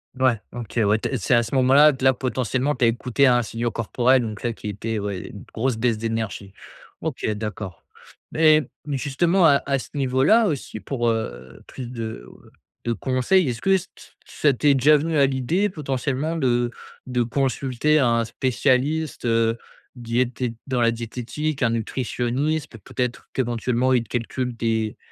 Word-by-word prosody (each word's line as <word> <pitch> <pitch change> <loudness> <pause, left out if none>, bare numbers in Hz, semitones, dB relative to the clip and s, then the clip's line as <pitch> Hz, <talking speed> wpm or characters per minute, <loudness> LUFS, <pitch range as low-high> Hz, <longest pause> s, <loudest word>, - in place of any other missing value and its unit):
Ouais, 130 -3 +2
OK, 120 -1 -5
ouais, 105 +2 +3
tu - - -3
es 135 - -1
c'est 115 +4 +2
à 120 - +4
ce 115 - -7
moment-là 135 +4 +6
que 130 - -8
là, 130 - +6
potentiellement, 130 +2 -1
tu 125 -1 +1
as - - +5
écouté 125 +4 +2
un 120 -1 +4
signaux 115 +2 -2
corporel, 120 +3 +2
donc 110 -2 -6
là, 120 - -1
qui 110 - -8
était, 110 +2 -3
ouais, 100 -2 -4
une 100 - -10
grosse 125 +1 -1
baisse 115 -1 0
d'énergie. 110 -3 -4 0.5
OK, 155 -5 -4
d'accord. 105 -4 -6 0.5
Mais 155 -1 +4 0.2
mais 140 -2 -2
justement, 170 +7 +2
à 140 -3 +5
à 140 - +2
ce - - -9
niveau-là 140 - +3
aussi, 140 -8 -4
pour, 120 -1 -1
heu, 65 - -4
plus 125 -2 -8
de, 110 - -6
heu, - - -17 0.3
de 120 - +1
conseils, 130 - +1
est-ce 115 -1 -4
que - - -1
ç 185 - -6
t - - -20 0.2
ça 145 -2 +1
t'est 140 +3 +3
déjà 145 +3 +5
venu 160 +2 -1
à 140 - +6
l'idée, 140 +10 0
potentiellement, 145 -1 -2
de 120 -5 +1 0.3
de 125 -1 -1
consulter 135 +3 +1
un 115 -3 +2
spécialiste, 130 +5 0
heu, 115 0 +2 0.4
diété 120 0 -2
dans 130 -3 -1
la 115 0 +4
diététique? 125 +6 -4
Un 120 - +3
nutritionniste? 125 +5 -2
Peut-être 125 -1 -4
qu'éventuellement 125 +1 0
il 125 -2 +3
te - - -21
calcule 125 +1 -3
tes 110 -2 -1
125 Hz, 175 wpm, -23 LUFS, 115-140 Hz, 0.5 s, moment-là